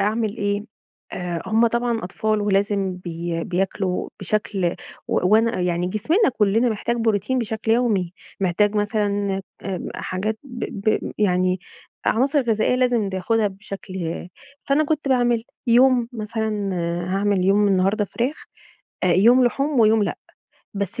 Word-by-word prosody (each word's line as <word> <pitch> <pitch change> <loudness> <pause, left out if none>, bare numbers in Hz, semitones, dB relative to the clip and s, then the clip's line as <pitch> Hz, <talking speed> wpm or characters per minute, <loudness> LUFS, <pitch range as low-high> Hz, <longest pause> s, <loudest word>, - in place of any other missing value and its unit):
أعمل 215 +2 0
إيه؟ 205 -1 -1 0.5
آآ 175 -2 -3
هم 225 +2 +3
طبعًا 235 -2 -1
أطفال 215 +3 -1
ولازم 200 -2 +1
بي 170 -1 -4
بياكلوا 185 0 -1
بشكل 195 -2 -1 0.3
و - - +1
وأنا 225 -1 +3
يعني 175 0 0
جسمنا 270 - +2
كُلّنا 220 +4 +3
محتاج 235 +2 -1
بروتين 225 +2 +1
بشكل 225 -1 -1
يومي. 210 -8 +1 0.3
محتاج 200 +3 +2
مثلًا 205 -2 0 0.2
آمم 190 -2 -4
حاجات 215 +4 -3
ب 245 -2 -6 0.3
ب - - -2
يعني 185 -2 +2 0.5
عناصر 275 +5 +3
غذائية 225 +1 +1
لازم 245 -5 +2
بياخدها 210 +4 0
بشكل 190 -3 -6 0.4
فأنا 290 +2 +2
كنت 300 -2 -1
باعمل 240 -3 +2 0.2
يوم 245 0 +4
مثلًا 215 -2 -2 0.4
هاعمل 195 -2 +1
يوم 205 +1 +4
النهارده 195 +3 +2
فراخ، 250 - -3 0.6
أ - - +3
يوم 235 +8 +5
لحوم 275 +1 +1
ويوم 220 0 +5
لأ. - - -2 0.6
بس 200 +3 -3
210 Hz, 130 wpm, -22 LUFS, 190-230 Hz, 0.6 s, يوم